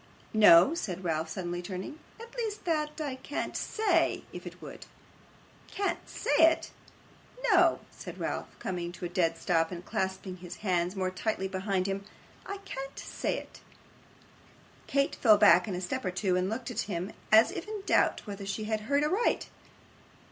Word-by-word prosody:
'No,' 210 - +8
said 190 - -4
Ralph, 160 -2 -1
suddenly 175 -2 -3
turning; 190 - -6 0.2
'at 465 +1 -11
least 440 -5 -3
that 305 -2 -1
I 285 -4 -3
can't 285 - -4
say 380 -7 +2
it, - - -12
if - - -7
it - - -10
would.' - - -10 0.8
'Can't 400 0 -3
say 290 - -1
it!' 325 0 +5 0.8
'No,' 355 -3 +5
said - - -9
Ralph, - - -2
coming 175 -2 -3
to 175 - -6
a - - -3
dead 170 -2 +1
stop, 165 0 +1
and 175 0 -7
clasping 190 0 -3
his 175 -1 -8
hands 180 0 +1
more 185 -1 -1
tightly 190 +1 -2
behind 190 0 -1
him. 195 0 -2 0.4
'I 400 - -4
can't 275 -5 -6
say - - -2
it.' - - -10 1.3
Kate 275 0 +1
fell 215 -4 +5
back 185 -3 +6
a 180 -3 -2
step 260 +9 -3
or 185 - 0
two, 185 0 0
and 185 +1 +1
looked 230 +3 -4
at - - -4
him, 185 +2 -3 0.2
as 220 +2 +7
if 370 - -6
in 425 -2 -5
doubt - - +2
whether 200 -2 -6
she 205 +2 -3
had 215 0 -1
heard 285 +1 +3
aright. 380 +10 +1
200 Hz, 170 wpm, -30 LUFS, 180-295 Hz, 1.3 s, No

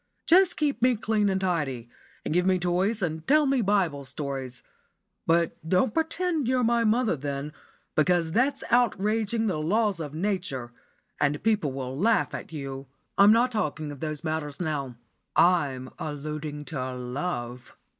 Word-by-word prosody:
Just 365 +2 +5
keep 295 -4 0
me 250 0 +4
clean 215 -1 +1
and 190 0 0
tidy, 150 -10 -1 0.4
and - - -1
give 180 +2 +2
me 185 -1 +4
toys 185 +4 0
and 160 -1 -3
tell 300 +1 +5
me 270 -2 +2
Bible 190 -9 +1
stories. 135 -2 -5 0.6
But 170 0 +2
don't 190 +5 +2
pretend 325 -3 0
you're 255 0 +2
my 235 0 +3
mother 225 -2 +2
then, 140 +1 -4 0.4
because 165 +1 +2
that's 255 +9 +1
outraging 225 -1 +2
the 185 -8 0
laws 200 +4 +1
of 150 -2 -5
Nature, 170 -10 -2 0.5
and 145 0 0
people 210 -10 +1
will 130 -1 -5
laugh 220 +9 +2
at - - -6
you. 135 -3 -6 0.3
I'm 200 +1 +7
not 240 +3 +4
talking 155 -8 -2
of 145 - -9
those 155 -1 -4
matters 155 -3 -3
now; 145 -7 -3 0.4
I'm 140 -8 +2
alluding 150 0 -5
to 130 -4 -4
love." 125 -1 -5
170 Hz, 155 wpm, -27 LUFS, 145-220 Hz, 0.6 s, I'm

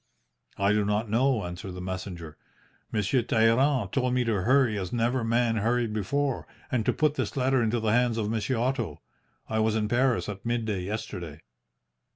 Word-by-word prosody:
"'I 100 +1 +2
do 105 0 +2
not 105 +1 -1
know,' 120 -3 +2
answered 90 +2 -6
the 90 - -7
messenger. 90 -4 -6 0.6
'Monsieur 110 +4 +1
Talleyrand 115 0 +2
told 125 -1 +1
me 125 - +2
to 110 -5 0
hurry 130 +1 +3
as 95 -3 -3
never 120 +1 0
man 115 0 +1
hurried 115 +1 0
before, 135 +6 -1 0.2
and 125 -4 +1
to - - +5
put 150 -1 +1
this 150 - -3
letter 130 0 +2
into 115 +1 +1
the 110 -1 0
hands 120 0 +2
of 110 -2 -1
Monsieur 115 +3 -1
Otto. 115 - -1 0.5
I 110 - -1
was 110 0 +2
in 110 -1 0
Paris 125 +2 +1
at 100 -1 -6
midday 110 -5 -1
yesterday.' 90 -5 -5
115 Hz, 180 wpm, -27 LUFS, 100-125 Hz, 0.6 s, to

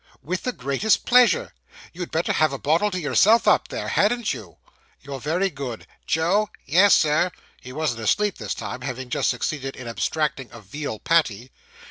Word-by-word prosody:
'With 185 +4 -3
the 250 - -2
greatest 140 - 0
pleasure.' 250 - +4 0.4
'You'd 175 0 -6
better 165 +2 0
have 155 -2 +2
a 135 - -4
bottle 165 +10 +1
to 185 -2 -3
yourself 210 +8 +3
up - - +4
there, - - -5
hadn't 230 -1 +1
you?' 110 -9 -11 0.4
'You're 140 -1 -7
very 175 +8 0
good.' 135 -5 -6 0.2
'Joe!' 185 +7 +1 0.2
'Yes, 185 +7 +5
Sir.' 155 +4 +2 0.3
(He 125 - -10
wasn't 145 -4 -2
asleep 205 - +1
this - - -4
time, 125 - -6
having 130 -1 -5
just - - +1
succeeded 135 +2 -3
in 125 - -9
abstracting 135 +2 -2
a 115 - -11
veal 110 +3 -6
patty.) 130 -6 0
155 Hz, 170 wpm, -23 LUFS, 130-185 Hz, 0.4 s, Yes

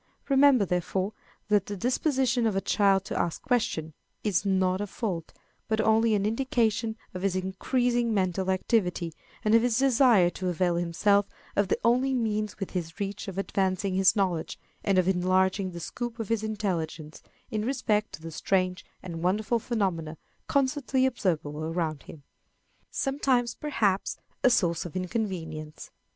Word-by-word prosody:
Remember, 270 -5 +5
therefore, 185 +3 -1 0.4
that 205 -3 +3
the 205 - -4
disposition 250 - +1
of 210 - 0
a - - +3
child 195 -1 +2
to - - -3
ask 170 - -1
questions 165 - 0 0.3
is 200 -4 +1
not 190 0 +2
a 205 - -2
fault, 185 -5 -4 0.4
but 220 -1 0
only 220 0 +3
an 200 -1 0
indication 225 -1 0 0.2
of 185 - -5
his 195 -1 0
increasing 235 +6 0
mental 190 -2 0
activity, 180 -3 0 0.3
and 215 - +3
of 230 - +7
his 240 -1 +1
desire 245 -8 +5
to 185 0 -3
avail 175 0 +1
himself 200 +4 +2 0.3
of 205 -1 +2
the 190 - +1
only 255 +3 +3
means 215 -3 -1
within 185 -2 -2
his 165 +4 -13
reach 200 0 -4
of 195 -1 -6
advancing 190 -1 0
his 190 0 +4
knowledge 185 -5 -1 0.3
and 195 -2 +2
of 185 -1 +3
enlarging 185 +1 +2
the 175 -1 -7
scope 240 +6 -5
of 225 -4 -5
his 225 -2 +1
intelligence 175 -8 -3 0.3
in 215 -2 -1
respect 220 -4 0
to 160 - -9
the 165 - -6
strange 185 +2 0 0.2
and 170 -3 -6
wonderful 210 +6 +1
phenomena 185 -9 -2 0.3
constantly 270 -1 +1
observable 155 - -1
around 160 -2 -2
him. 150 -4 -12 0.7
Sometimes, 265 -3 0
perhaps, 210 -10 0 0.3
a - - +7
Source 170 -9 +2
of 175 - -8
Inconvenience. 175 -6 -4
195 Hz, 155 wpm, -28 LUFS, 180-230 Hz, 0.7 s, of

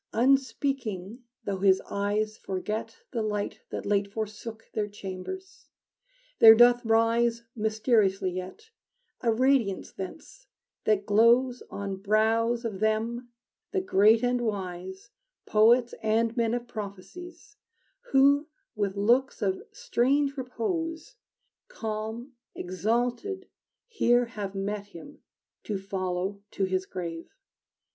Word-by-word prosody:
Unspeaking, 255 -4 0 0.2
though 200 -3 -3
his 190 -1 +4
eyes 210 +2 -1
forget 215 +3 -5
The 235 - -2
light 210 -1 -2
that - - -5
late 200 -1 +1
forsook 220 +1 -6
Their 210 -1 -1
chambers, 210 - -8 0.7
there 225 0 +10
doth 240 +1 +6
rise 230 +1 +2
Mysteriously 215 -3 +1
yet 185 - -8 0.5
A 230 - +2
radiance 240 -4 +1
thence 195 - -9 0.4
that 205 -2 +2
glows 240 +4 +4
On 200 -1 -4
brows 225 +4 +1
of 210 -4 -4
them, 225 +3 -1 0.4
the 385 - +2
great 225 - +4
and 245 0 +1
wise, 190 -1 -5 0.3
Poets 235 +3 +4
and 225 +1 +1
men 230 -1 +1
of 245 0 -5
prophecies, 245 - -9 0.5
Who, 280 +2 +5 0.3
with 200 -2 -2
looks 240 +4 +2
of 190 -1 0
strange 275 +3 +1
repose, 325 - -4 0.5
Calm, 225 - -5 0.2
exalted, 240 - -2 0.4
here 245 - +3
have 205 -4 -6
met 200 +1 -3
Him 205 - -12 0.5
to 210 - -2
follow 190 0 -3
to 200 - -3
his 185 0 -1
grave. 170 -2 -6
220 Hz, 110 wpm, -28 LUFS, 200-245 Hz, 0.7 s, there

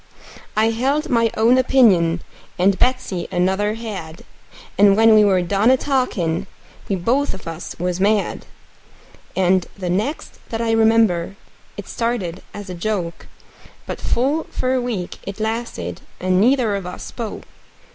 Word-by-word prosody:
I 220 +1 +3
held 270 +6 0
my 230 -2 +3
own 235 +4 +5
opinion, 190 -11 +4 0.3
and 190 +2 +2
Betsey 245 -8 0
another 190 +4 +1
had; 190 -8 -7 0.5
And 200 0 +5
when 225 0 +6
we 215 -1 +7
were 190 -3 +3
done 200 +6 +2
a 260 - +5
talkin', 200 - -1 0.4
we 200 - +1
both 240 +8 0
of 190 - -12
us 165 +1 -6
was 180 +1 -2
mad. 205 +1 0 0.9
And 185 -1 +2
the 180 -3 -3
next 215 - -3
that 225 - -3
I 230 -1 0
remember, 220 -5 +3 0.4
it - - -7
started 210 -7 -2
in 205 - -7
a 185 - -6
joke; 175 -2 -3 0.6
But - - -6
full 280 +7 0
for 255 0 -1
a 255 - +1
week 220 -8 -4
it 195 +2 -8
lasted, 220 - -3 0.2
and 185 0 +2
neither 240 -3 +3
of 195 -3 -4
us 180 - -7
spoke. 225 -4 -6
205 Hz, 150 wpm, -20 LUFS, 180-235 Hz, 0.9 s, we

